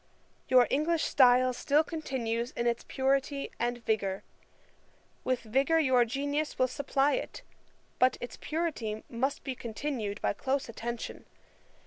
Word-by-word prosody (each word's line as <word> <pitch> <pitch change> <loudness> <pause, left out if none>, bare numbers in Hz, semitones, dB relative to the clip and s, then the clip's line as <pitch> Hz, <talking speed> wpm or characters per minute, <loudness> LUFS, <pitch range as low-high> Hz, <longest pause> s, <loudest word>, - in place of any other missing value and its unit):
Your 255 -1 +6
English 315 +4 +1
style 255 -1 +5
still 290 +5 +2
continues 250 -8 -3
in 235 - -2
its 235 -1 0
purity 275 +1 0
and 240 -1 -2
vigour. 200 -3 0 1.0
With 255 -1 0
vigour 270 +8 +2
your 260 -6 +4
genius 285 +5 -2
will 255 - +3
supply 275 +2 +1
it; - - -4 0.6
but 255 0 +4
its 245 -2 -6
purity 290 -10 -2
must 260 +4 -1
be 265 - -3
continued 230 -3 -4
by - - 0
close 265 +6 -1
attention. 235 0 -6
255 Hz, 130 wpm, -30 LUFS, 235-285 Hz, 1.0 s, Your